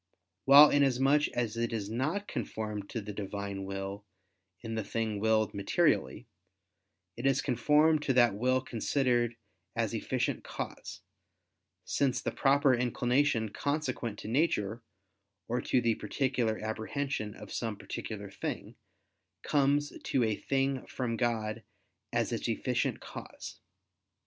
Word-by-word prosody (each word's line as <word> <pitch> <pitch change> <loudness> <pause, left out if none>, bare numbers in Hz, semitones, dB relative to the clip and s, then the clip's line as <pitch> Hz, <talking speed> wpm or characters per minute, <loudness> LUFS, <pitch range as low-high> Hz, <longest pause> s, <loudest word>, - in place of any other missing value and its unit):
While, 145 +2 +9
inasmuch 140 +1 +3
as 120 -3 -1
it 115 0 -1
is 110 -3 -2
not 145 - -2
conformed 105 -2 -4
to 115 - -3
the 105 0 -7
Divine 100 -1 -4
will 95 +1 -5 0.6
in 115 -1 -5
the 110 -1 -1
thing 110 0 -2
willed 110 0 +2
materially, 125 - +1 0.9
it 120 +3 -1
is 135 0 +3
conformed 150 +5 +3
to 135 - +1
that 120 -4 +5
will 130 +5 +1
considered 120 -1 0 0.4
as - - 0
efficient - - -1
cause; - - -6 0.8
since 130 -3 +1
the - - -2
proper 140 0 +4
inclination 125 -1 +1
consequent 140 -4 -2
to - - -8
nature, 115 -5 +1 0.7
or 120 +1 -1
to - - +2
the 115 -2 +2
particular 125 -3 -1
apprehension 110 +1 -3
of - - -10
some 110 -3 -3
particular 100 -2 -6
thing, - - -5 0.7
comes 145 0 +2
to 130 - +2
a 110 -2 +1
thing 135 +1 0
from 120 -3 -2
God 115 -2 -1 0.5
as - - 0
its - - -2
efficient - - -1
cause. - - -9
120 Hz, 130 wpm, -31 LUFS, 110-135 Hz, 0.9 s, While